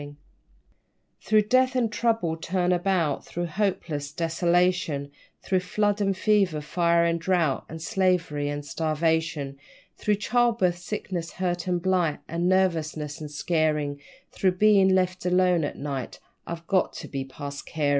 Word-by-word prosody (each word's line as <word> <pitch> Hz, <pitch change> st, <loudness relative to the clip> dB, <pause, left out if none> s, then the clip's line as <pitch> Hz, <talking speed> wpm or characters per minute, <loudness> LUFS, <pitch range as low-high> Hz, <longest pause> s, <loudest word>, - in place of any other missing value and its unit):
_ 145 Hz, 0 st, -9 dB, 1.1 s
Through 215 Hz, 0 st, +3 dB
Death 255 Hz, +4 st, +3 dB
and 235 Hz, -3 st, +1 dB
Trouble, 225 Hz, -8 st, 0 dB
turn 180 Hz, +2 st, -1 dB
about, 175 Hz, -4 st, +1 dB
Through 175 Hz, 0 st, -4 dB
hopeless 165 Hz, -6 st, -2 dB
desolation, 170 Hz, -3 st, +1 dB, 0.3 s
Through 185 Hz, -, +1 dB
flood 205 Hz, +3 st, 0 dB
and 195 Hz, -1 st, +1 dB
fever, 195 Hz, -7 st, +2 dB
fire 170 Hz, +2 st, +2 dB
and 170 Hz, 0 st, +1 dB
drought, 165 Hz, -6 st, +1 dB
And 160 Hz, -, -7 dB
slavery 165 Hz, -5 st, 0 dB
and 145 Hz, 0 st, -4 dB
starvation; 155 Hz, -2 st, -1 dB, 0.4 s
Through 210 Hz, -, +1 dB
childbirth, 225 Hz, -5 st, +1 dB
sickness, 180 Hz, -3 st, -5 dB
hurt, 180 Hz, -1 st, -2 dB
and 180 Hz, -1 st, +1 dB
blight, 175 Hz, -3 st, +1 dB
And 170 Hz, +2 st, 0 dB
nervousness 160 Hz, -5 st, 0 dB
an' 150 Hz, -, -6 dB
scarin', 150 Hz, -1 st, 0 dB, 0.3 s
Through 185 Hz, -2 st, +1 dB
bein' 195 Hz, -1 st, +5 dB
left 185 Hz, 0 st, 0 dB
alone 180 Hz, -2 st, +3 dB
at -, -, -3 dB
night, 140 Hz, -3 st, -5 dB, 0.3 s
I've 170 Hz, 0 st, -6 dB
got 185 Hz, +1 st, +1 dB
to -, -, -7 dB
be 135 Hz, -1 st, -4 dB
past 140 Hz, +1 st, -8 dB
carin'. 150 Hz, -3 st, -1 dB
175 Hz, 145 wpm, -26 LUFS, 155-190 Hz, 1.1 s, bein